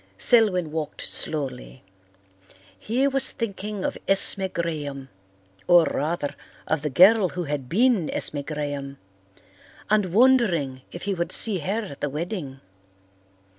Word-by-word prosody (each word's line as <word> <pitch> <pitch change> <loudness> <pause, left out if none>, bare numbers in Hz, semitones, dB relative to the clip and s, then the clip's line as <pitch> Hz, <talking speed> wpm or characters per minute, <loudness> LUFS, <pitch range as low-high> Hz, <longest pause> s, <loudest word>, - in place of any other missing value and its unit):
Selwyn 195 -9 +3
walked 155 -1 -5
slowly. 130 - -2 1.0
He 250 +5 0
was 270 -1 +2
thinking 205 -2 -5
of - - -3
Esme 195 0 +4
Graham 150 -6 -5 0.6
or, 175 -1 +6
rather, 150 -1 -2 0.3
of 155 -2 -1
the 150 - -2
girl 190 - +5
who 180 +1 -5
had 145 -4 -5
been 220 -4 +2
Esme 145 - -1
Graham, 145 -2 -5 0.9
and 210 -3 +3
wondering 190 - +2
if 175 - -8
he 200 - -1
would 170 -2 -3
see 210 -5 +3
her 200 +8 -2
at 145 -9 -10
the 145 - -1
wedding. 150 -3 -6
170 Hz, 130 wpm, -24 LUFS, 145-205 Hz, 1.0 s, or